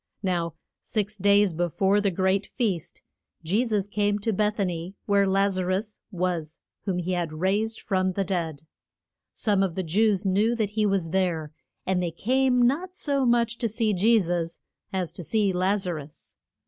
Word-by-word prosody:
Now 170 -3 -1 0.3
six 215 -1 -2
days 200 -1 +4
be 175 +2 0
fore 195 +4 +2
the 205 - +2
great 190 +2 +1
feast, 200 - -3 0.4
Je 195 +9 +2
sus 210 -4 0
came 205 0 0
to 215 +2 -1
Beth 210 +2 +1
a 200 - +1
ny, 175 +1 -4
where 200 -1 +3
Laz 195 0 +2
a 185 - -1
rus 205 +3 -2
was 175 -5 -2 0.3
whom 190 -3 -1
he 180 +1 -2
had 175 -3 -1
raised 200 +7 0
from 185 -2 0
the 195 - 0
dead. 165 -6 -3 0.7
Some 205 -3 +1
of 190 -4 0
the 190 - -1
Jews 200 +3 +2
knew 205 +5 +2
that 215 -3 -1
he 210 0 +1
was 190 -5 0
there, 170 -5 0 0.3
and 185 -1 +1
they 175 - 0
came 250 +7 +2
not 340 +9 +1
so 280 -6 0
much 235 -1 +2
to 230 - 0
see 220 0 0
Je 220 +5 +4
sus 170 -2 -2 0.3
as 185 -3 -2
to 175 - -8
see 205 +2 +1
Laz 190 +2 +1
a 180 - -1
rus. 150 -2 -10
195 Hz, 185 wpm, -26 LUFS, 180-215 Hz, 0.7 s, days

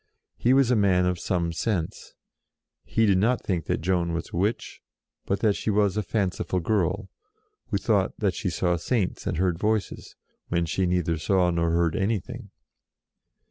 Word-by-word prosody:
He 120 - +1
was 135 -2 +4
a - - +4
man 95 -4 +3
of 90 -1 0
some 85 -3 -1
sense; 90 -2 -3 0.7
he 115 - +1
did 95 -3 +3
not 120 +5 +1
think 90 -5 -2
that - - -1
Joan 85 -1 0
was 85 0 -4
a - - -7
witch, 100 +6 -2 0.5
but 100 - -1
that 105 -3 +3
she - - -3
was 100 -2 +2
a 105 - +1
fanciful 95 -3 -1
girl, 90 -1 -1 0.6
who - - 0
thought - - 0
that - - 0
she - - -2
saw 90 -1 0
Saints 100 +1 -2
and 90 -5 -1
heard 90 -1 0
Voices, 110 0 -2 0.3
when 85 0 0
she 90 +3 0
neither 85 -2 0
saw 90 +1 +2
nor 85 0 +1
heard 85 -1 +1
anything. 110 +3 -2
95 Hz, 175 wpm, -26 LUFS, 85-105 Hz, 0.7 s, was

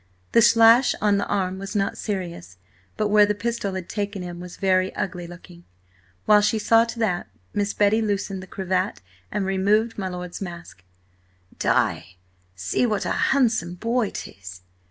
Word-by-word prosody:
The 230 - +5
slash 230 +3 +6
on 205 -1 +2
the 200 - -1
arm 190 -2 -1
was 195 +2 -7
not 200 -1 0
serious, 170 - -5 0.4
but 215 - 0
where 210 0 +6
the 210 - 0
pistol 205 -2 -3
had 185 -2 -5
taken 205 -2 -4
him 175 -1 -7
was 180 0 -9
very 185 -1 +2
ugly 180 -2 -4
looking. 175 0 -13 0.6
While 210 -1 +6
she 215 +2 +1
saw 225 +2 +4
to 235 - -7
that, 200 -6 -1 0.3
Miss 205 0 -1
Betty 210 +2 +3
loosened 200 -2 -2
the 190 - -11
cravat 185 0 -2 0.3
and 205 - -1
removed 205 +4 +1
my 190 - -2
lord's 180 0 -6
mask. 170 - -8 0.8
"Di, 90 - 0 0.4
see 95 - 0
what 210 -3 -1
a - - -1
handsome 225 -10 +1
boy 230 +2 0
'tis! 95 -1 -9
195 Hz, 165 wpm, -23 LUFS, 180-215 Hz, 0.8 s, slash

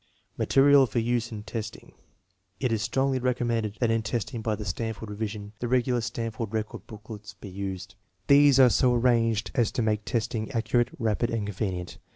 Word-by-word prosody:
Material 140 0 +5
for 120 - -5
use 120 0 0
in 105 -2 -6
testing. 110 -1 -6 0.7
It 125 -3 0
is 110 -2 0
strongly 135 +3 0
recommended 120 -4 -1
that 120 -2 +3
in 115 0 +1
testing 115 +2 -3
by 110 -1 -1
the 105 - -7
Stanford 110 +2 -4
revision 105 0 -5
the 120 - -2
regular 125 0 +1
Stan 115 0 -3
ford 110 -1 -5
record 110 -1 -4
booklets 105 -1 -10
be 100 - -10
used. 95 0 -5 0.3
These 140 -1 +6
are 125 -2 +7
so 125 +1 +3
arranged 115 -4 +2
as 115 -3 +1
to 120 - 0
make 105 -1 0
testing 110 -1 -2
accurate, 120 +1 +1
rapid, 115 +1 0
and 115 -3 -2
convenient. 95 -3 -4
115 Hz, 180 wpm, -27 LUFS, 105-120 Hz, 0.7 s, are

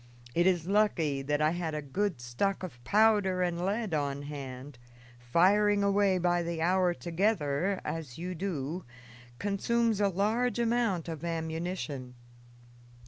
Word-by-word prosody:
It 175 +5 +3
is 175 -3 +2
lucky 175 -8 +1
that 145 +2 0
I 155 - +3
had 170 -2 -3
a 150 - -2
good 180 +2 -1
stock 185 +13 -1
of 125 -10 -8
powder 205 - +3
and 175 -1 -1
lead 205 +1 -1
on 140 -2 -1
hand; 135 -2 -8 0.4
firing 200 +11 +3
away 200 -1 +3
by 175 0 +2
the 170 -1 -3
hour 180 +1 +2
together, 175 -1 0
as 155 -6 -5
you 180 +2 -4
do, 170 -2 -3 0.5
consumes 220 - 0
a 200 - +4
large 220 +7 0
amount 230 -7 +1
of 160 -2 -6
ammunition. 160 -5 -4
175 Hz, 140 wpm, -30 LUFS, 150-200 Hz, 0.5 s, a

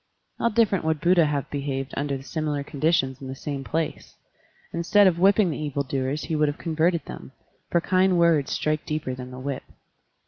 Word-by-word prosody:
How 235 - +2
different 210 -4 +2
would 160 -1 +1
Buddha 170 0 +4
have 145 -2 -2
behaved 140 -1 -3
tinder 140 -1 -3
similar 150 -1 -2
conditions 140 -3 0
in 135 - -7
the 130 - -5
same 140 0 -5
place! 160 +3 -3 0.6
Instead 170 +5 +4
of 175 -3 +3
whipping 195 0 +4
the - - -4
evil 145 -2 -2
doers 135 +2 -2
he 160 - -2
would 150 0 +3
have 145 - -2
converted 165 -1 0
them, 130 - -9 0.4
for 170 - +2
kind 185 0 +3
words 165 -5 +3
strike 155 0 0
deeper 150 -4 -3
than 125 0 -7
the 125 - -9
whip. 135 +1 -4
150 Hz, 185 wpm, -25 LUFS, 140-170 Hz, 0.6 s, Buddha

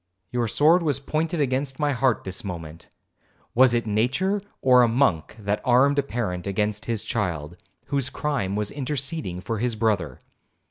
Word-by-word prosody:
Your 120 -1 0
sword 155 - +4
was 145 -4 0
pointed 160 +4 -2
against 135 -1 0
my 150 -1 +2
heart 130 -2 +1
this 95 0 -5
moment; 85 -4 -7 0.6
was 130 +1 +6
it 115 - 0
nature 130 - +1 0.2
or 125 -1 +6
a 120 - +5
monk 115 - +1
that 105 -1 -2
armed 140 +3 +4
a - - +5
parent 105 -9 -3
against 105 +1 -1
his 115 -3 -2
child, 85 -7 -3 0.3
whose 140 -2 -1
crime 130 -10 -2
was—interceding 135 - -3
for 110 +2 -3
his 120 0 0
brother? 100 - 0
120 Hz, 155 wpm, -24 LUFS, 100-140 Hz, 0.6 s, was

